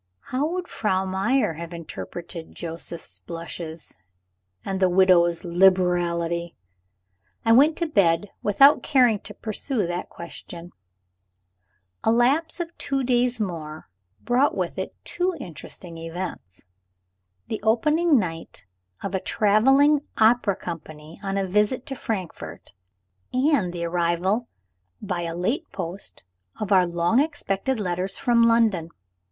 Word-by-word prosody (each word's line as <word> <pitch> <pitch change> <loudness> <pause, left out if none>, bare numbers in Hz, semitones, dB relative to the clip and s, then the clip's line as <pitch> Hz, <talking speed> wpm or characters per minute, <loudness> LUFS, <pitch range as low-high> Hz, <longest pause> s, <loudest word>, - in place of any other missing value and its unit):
How 270 +4 +1
would 355 +2 -3
Frau 190 -3 0
Meyer 195 +3 +1
have 170 +2 -7
interpreted 170 0 -8
Joseph's 165 - -5
blushes, 165 - -7 0.7
and 195 -1 -2
the 185 -1 +4
widow's 175 -2 +4
liberality? 175 -2 +2 0.9
I 225 - +4
went 290 +7 +6
to 340 - 0
bed 200 - +2
without 275 +8 +5
caring 250 -7 +3
to - - -11
pursue 220 0 -2
that 175 +1 -4
question. 170 0 -10 1.3
A - - +3
lapse 270 +10 +2
of 340 -1 -5
two 275 -1 -1
days 245 -1 +2
more 160 -6 -5 0.3
brought 250 +4 +2
with - - -2
it - - -5
two 365 0 -1
interesting 165 0 -8
events: 165 - -7 0.8
the 220 - -4
opening 300 +9 +3
night 165 - -4 0.4
of 195 - -4
a 190 - +1
traveling 270 +10 +4 0.2
opera 220 -2 +4
company 155 -2 -8
on 195 -1 -2
a 195 - 0
visit 210 +6 +1
to 270 - -5
Frankfort, 195 -9 -6 0.6
and 255 - +2
the 170 -1 -4
arrival 175 +6 0 0.5
by 175 -1 -3
a 165 -1 -4
late 250 - -1
post 175 +4 -6 0.4
of 210 -1 -3
our 185 -2 +5
long 170 +7 +2
expected 265 -5 -1
letters 185 0 -2
from 235 -1 +3
London. 220 -8 +2
195 Hz, 125 wpm, -24 LUFS, 170-245 Hz, 1.3 s, went